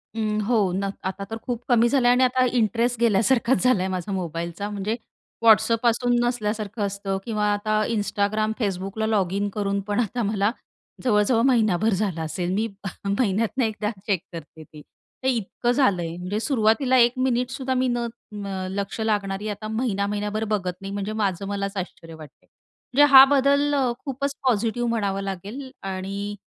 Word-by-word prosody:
उम, 215 Hz, -1 st, -1 dB
हो 240 Hz, 0 st, +2 dB, 0.2 s
न 195 Hz, +1 st, -1 dB
आता 190 Hz, +1 st, -3 dB
तर 225 Hz, -, -4 dB
खूप 245 Hz, -1 st, -4 dB
कमी 240 Hz, -1 st, +5 dB
झालंय 245 Hz, -3 st, +4 dB
आणि 250 Hz, +1 st, +4 dB
आता 255 Hz, 0 st, +3 dB
इंटरेस्ट 235 Hz, +2 st, +1 dB
गेल्यासारखाच 235 Hz, +1 st, +2 dB
झालाय 200 Hz, -7 st, +3 dB
माझा 185 Hz, +1 st, -4 dB
मोबाईलचा, 170 Hz, +1 st, -4 dB
म्हणजे 210 Hz, +2 st, -2 dB, 0.5 s
WhatsApp 220 Hz, +1 st, +5 dB
असून 245 Hz, +1 st, +1 dB
नसल्यासारखं 215 Hz, -2 st, -2 dB
असतं 195 Hz, -1 st, -3 dB
किंवा 215 Hz, -2 st, -1 dB
आता 215 Hz, +1 st, 0 dB
Instagram, 215 Hz, +1 st, 0 dB
Facebookला 195 Hz, +1 st, -2 dB
लॉगिन 200 Hz, -1 st, 0 dB
करून 200 Hz, -1 st, 0 dB
पण 205 Hz, +1 st, 0 dB
आता 240 Hz, +1 st, -1 dB
मला 205 Hz, +1 st, +1 dB, 0.5 s
जवळ-जवळ 225 Hz, 0 st, +3 dB
महिनाभर 220 Hz, -5 st, +3 dB
झाला 190 Hz, -4 st, -1 dB
असेल. 175 Hz, +3 st, -3 dB
मी 220 Hz, +3 st, 0 dB, 0.4 s
महिन्यातनं 215 Hz, +4 st, 0 dB
एकदा 215 Hz, -1 st, -2 dB, 0.2 s
चेक 195 Hz, -5 st, 0 dB
करते 160 Hz, -1 st, -9 dB
ते. 150 Hz, 0 st, -14 dB, 0.5 s
इतकं 240 Hz, +1 st, -1 dB
झालंय. 180 Hz, -, +1 dB
म्हणजे 180 Hz, +4 st, -3 dB
सुरुवातीला 230 Hz, +2 st, +2 dB
1 240 Hz, -1 st, +5 dB
मिनिट 250 Hz, -1 st, +1 dB
सुद्धा 260 Hz, 0 st, -3 dB
मी 255 Hz, 0 st, +1 dB
न 240 Hz, -, 0 dB, 0.5 s
अ, 190 Hz, -1 st, -4 dB
लक्ष 200 Hz, +2 st, -4 dB
लागणारी 205 Hz, -2 st, -1 dB
आता 210 Hz, +1 st, -5 dB
महिना-महिनाभर 210 Hz, -1 st, -1 dB
बघत 185 Hz, -3 st, -1 dB
नाही, 195 Hz, -, -6 dB
म्हणजे 205 Hz, +1 st, -3 dB
माझं 195 Hz, 0 st, -1 dB
मलाच 200 Hz, 0 st, -3 dB
आश्चर्य 165 Hz, -3 st, -6 dB
वाटतंय. 155 Hz, -2 st, -14 dB, 0.5 s
म्हणजे 290 Hz, -, +6 dB
हा 265 Hz, 0 st, +12 dB
बदल 280 Hz, +2 st, +3 dB
अ, 260 Hz, -3 st, +2 dB
खूपच 280 Hz, +1 st, -3 dB
पॉझिटिव्ह 235 Hz, +1 st, +1 dB
म्हणावं 200 Hz, -4 st, -1 dB
लागेल 200 Hz, +8 st, -6 dB, 0.2 s
आणि 200 Hz, +2 st, -4 dB
210 Hz, 155 wpm, -24 LUFS, 195-240 Hz, 0.5 s, हा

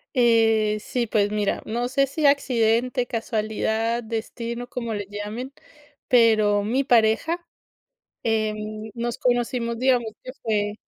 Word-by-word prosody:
Eh, 225 Hz, -3 st, +3 dB
sí, 240 Hz, +3 st, -2 dB
pues, 205 Hz, -1 st, +1 dB
mira, 210 Hz, -1 st, -1 dB
no 240 Hz, +3 st, -2 dB
sé 275 Hz, +1 st, +2 dB
si 295 Hz, +3 st, -2 dB
accidente, 250 Hz, -2 st, +2 dB
casualidad, 225 Hz, 0 st, -1 dB
destino, 235 Hz, +2 st, -5 dB
como 235 Hz, -2 st, -4 dB
le 205 Hz, -2 st, -3 dB
llamen, 210 Hz, +6 st, -6 dB, 0.5 s
pero 215 Hz, -4 st, +4 dB
mi 250 Hz, +6 st, +1 dB
pareja, 245 Hz, +8 st, +2 dB, 0.8 s
eh, 220 Hz, -1 st, 0 dB, 0.4 s
nos 235 Hz, 0 st, -3 dB
conocimos, 240 Hz, -1 st, 0 dB
digamos 245 Hz, -3 st, +2 dB
que 255 Hz, -, -8 dB
fue 210 Hz, -2 st, 0 dB
230 Hz, 120 wpm, -24 LUFS, 220-245 Hz, 0.8 s, pero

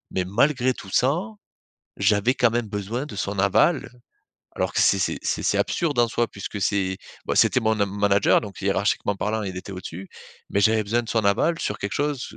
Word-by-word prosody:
mais 95 Hz, -, 0 dB
malgré 130 Hz, +6 st, +2 dB
tout 95 Hz, -, -11 dB
ça, 130 Hz, +8 st, +3 dB, 0.8 s
j'avais 105 Hz, +4 st, +2 dB
quand 120 Hz, -2 st, +3 dB
même 120 Hz, -1 st, -1 dB
besoin 105 Hz, +6 st, -4 dB
de 150 Hz, -, -9 dB
son 100 Hz, 0 st, -3 dB
aval, 100 Hz, -, +2 dB, 0.7 s
alors -, -, -1 dB
que -, -, +1 dB
c'est 100 Hz, -, +4 dB
c'est 95 Hz, -, -1 dB
c'est -, -, -2 dB
c'est -, -, +2 dB
absurde 160 Hz, -4 st, 0 dB
en 120 Hz, -, +3 dB
soi 120 Hz, +1 st, 0 dB
puisque 100 Hz, -1 st, -7 dB
c'est, 95 Hz, -1 st, 0 dB, 0.3 s
bah, -, -, 0 dB
c'était -, -, +4 dB
mon 110 Hz, -1 st, +1 dB
nam 100 Hz, -1 st, -1 dB
manager, 100 Hz, 0 st, +3 dB
donc 100 Hz, -3 st, -9 dB
hiérarchiquement 100 Hz, +1 st, 0 dB
parlant 105 Hz, +2 st, -2 dB
il 95 Hz, -2 st, -5 dB
était 95 Hz, -, -7 dB
au-dessus, 95 Hz, 0 st, -8 dB, 0.4 s
mais -, -, 0 dB
j'avais 110 Hz, +2 st, +3 dB
besoin 115 Hz, +4 st, 0 dB
de 115 Hz, -, -12 dB
son 110 Hz, -3 st, 0 dB
aval 160 Hz, +12 st, +2 dB
sur 105 Hz, -, -3 dB
quelque 100 Hz, -, -4 dB
chose 145 Hz, -3 st, -2 dB
105 Hz, 205 wpm, -24 LUFS, 100-120 Hz, 0.8 s, c'est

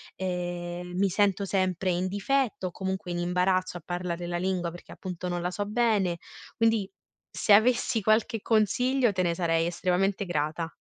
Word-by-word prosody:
Ehm, 175 Hz, -1 st, -4 dB
mi 195 Hz, 0 st, +3 dB
sento 200 Hz, +1 st, +2 dB
sempre 185 Hz, -1 st, 0 dB
in 180 Hz, +2 st, 0 dB
difetto 205 Hz, +1 st, 0 dB
o -, -, -6 dB
comunque 190 Hz, -1 st, -4 dB
in 175 Hz, -, -2 dB
imbarazzo 180 Hz, +1 st, +1 dB
a -, -, -11 dB
parlare 175 Hz, -1 st, -3 dB
la 175 Hz, 0 st, -2 dB
lingua, 180 Hz, -1 st, -1 dB
perché 175 Hz, -, -12 dB
appunto 180 Hz, -1 st, -6 dB
non 175 Hz, -1 st, -2 dB
la 180 Hz, -, -1 dB
so 205 Hz, +3 st, -3 dB
bene. 210 Hz, -6 st, +1 dB, 0.4 s
Quindi 225 Hz, -4 st, +2 dB, 0.4 s
se -, -, -1 dB
avessi 235 Hz, +2 st, +4 dB
qualche 215 Hz, 0 st, +2 dB
consiglio, 245 Hz, +3 st, +2 dB
te 185 Hz, 0 st, 0 dB
ne 170 Hz, -, +1 dB
sarei 165 Hz, -2 st, +1 dB
estremamente 185 Hz, +3 st, 0 dB
grata. 160 Hz, 0 st, -2 dB
185 Hz, 165 wpm, -28 LUFS, 175-205 Hz, 0.4 s, avessi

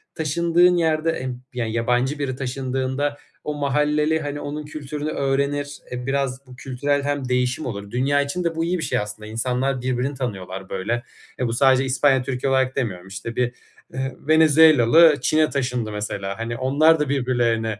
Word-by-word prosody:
taşındığın 170 Hz, +3 st, +3 dB
yerde 160 Hz, -1 st, +1 dB
emm, 125 Hz, -3 st, -5 dB
yani, 115 Hz, -3 st, -2 dB
yabancı 125 Hz, +5 st, 0 dB
biri 130 Hz, -3 st, -2 dB
taşındığında 130 Hz, +2 st, -2 dB, 0.3 s
o 150 Hz, -, -3 dB
mahalleli, 150 Hz, +2 st, +1 dB
hani, 145 Hz, -1 st, -4 dB
onun 150 Hz, +1 st, -5 dB
kültürünü 150 Hz, 0 st, -5 dB
öğrenir, 140 Hz, +1 st, -1 dB
eee, 125 Hz, 0 st, -5 dB
biraz 135 Hz, -1 st, -2 dB
bu 125 Hz, -, -12 dB
kültürel 140 Hz, +3 st, -1 dB
hem 145 Hz, -2 st, -2 dB
değişim 125 Hz, +3 st, 0 dB
olur. 100 Hz, -4 st, -6 dB
Dünya 140 Hz, +3 st, +2 dB
için 140 Hz, +6 st, -3 dB
de 165 Hz, -1 st, -1 dB
bu 165 Hz, -, -1 dB
iyi 180 Hz, +2 st, 0 dB
bir 165 Hz, -, -4 dB
şey, 125 Hz, -, 0 dB
aslında. 105 Hz, +1 st, -6 dB
İnsanlar 125 Hz, +3 st, -1 dB
birbirini 130 Hz, +2 st, -1 dB
tanıyorlar 95 Hz, -7 st, -5 dB
böyle. 110 Hz, +6 st, -2 dB, 0.4 s
E, 125 Hz, -, 0 dB
bu 115 Hz, -, -2 dB
sadece 135 Hz, +1 st, +4 dB
İspanya-Türkiye 130 Hz, 0 st, +1 dB
olarak 130 Hz, -1 st, +1 dB
demiyorum. 95 Hz, -9 st, -3 dB
İşte, 100 Hz, +4 st, -7 dB
bir, 125 Hz, -1 st, 0 dB, 0.4 s
ııı, 130 Hz, 0 st, -2 dB, 0.2 s
Venezuelalı 155 Hz, -1 st, +6 dB
Çin'e 155 Hz, +2 st, +2 dB
taşındı 125 Hz, -5 st, -2 dB
mesela. 100 Hz, -1 st, -4 dB
Hani, 115 Hz, +1 st, -3 dB
onlar 150 Hz, +5 st, +4 dB
da 150 Hz, -2 st, -1 dB
birbirlerine 120 Hz, -5 st, 0 dB
130 Hz, 165 wpm, -22 LUFS, 125-145 Hz, 0.4 s, Venezuelalı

